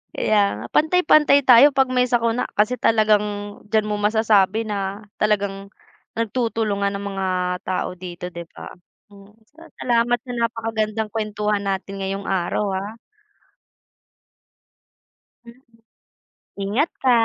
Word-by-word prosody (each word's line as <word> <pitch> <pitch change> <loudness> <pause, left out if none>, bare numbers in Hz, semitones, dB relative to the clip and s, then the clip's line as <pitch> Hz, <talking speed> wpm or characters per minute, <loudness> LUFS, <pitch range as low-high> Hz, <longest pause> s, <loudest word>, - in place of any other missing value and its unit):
Kaya 215 -1 +2 0.2
nga, - - -7
pantay-pantay 310 -3 +4
tayo 255 +4 +8
'pag 270 -1 +2
may 250 -1 +2
sakuna 235 -1 0
kasi 210 +4 +1
talagang, 215 -3 +3 0.5
diyan 215 -1 +2
mo 210 - -1
masasabi 215 0 +2
na, 200 0 -3 0.2
talagang 200 -2 -1 0.5
nagtutulungan 220 -3 -1
ang 200 0 -5
mga 190 0 -2 0.4
tao 185 0 -3
dito 180 -1 -8
'di 170 -1 -8
ba? - - -10 0.4
Hmm, 200 0 -17 0.2
sala 330 0 -15
salamat 240 0 +2
sa 245 +1 -10
napakagandang 225 -2 -2
kuwentuhan 210 -1 -1
natin 195 0 -4
ngayong 195 +1 -4
araw, 190 +2 -1
ah. 195 +2 -4 2.5
Mhm. 235 +2 -16 1.0
Ingat 235 - 0
ka. 260 - +3
215 Hz, 120 wpm, -21 LUFS, 200-235 Hz, 2.5 s, tayo